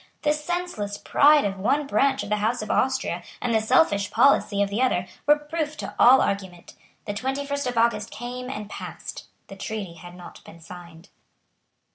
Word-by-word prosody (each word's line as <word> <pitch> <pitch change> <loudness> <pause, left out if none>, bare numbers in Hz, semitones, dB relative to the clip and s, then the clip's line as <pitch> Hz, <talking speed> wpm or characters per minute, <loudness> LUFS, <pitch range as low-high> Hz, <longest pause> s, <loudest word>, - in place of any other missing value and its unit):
The 295 -1 +3
senseless 300 - -4
pride 295 +3 +4
of 195 -1 -3
one 280 +9 +1
branch 275 0 +1
of - - -7
the 210 - +1
House 220 +2 -1
of 215 - -4
Austria 265 0 0 0.2
and 245 -2 -1
the 220 - +3
selfish 205 - +2
policy 220 -4 +3
of 200 - -4
the 215 +5 -1
other 185 -9 +1 0.2
were 295 +1 +6
proof 300 0 -4
to - - -6
all 260 +2 +7
argument. 190 -3 -3 0.3
The 205 - -3
twenty 265 +6 -3
first 280 -1 -3
of 245 -1 -3
August 230 -2 +1
came 250 +1 -7
and 210 -6 -6
passed; - - -8 0.2
the 195 - -11
treaty 195 -2 -5
had 175 +1 -12
not 180 -1 -12
been 170 - -14
signed. 170 +1 -13
230 Hz, 185 wpm, -24 LUFS, 200-280 Hz, 0.3 s, all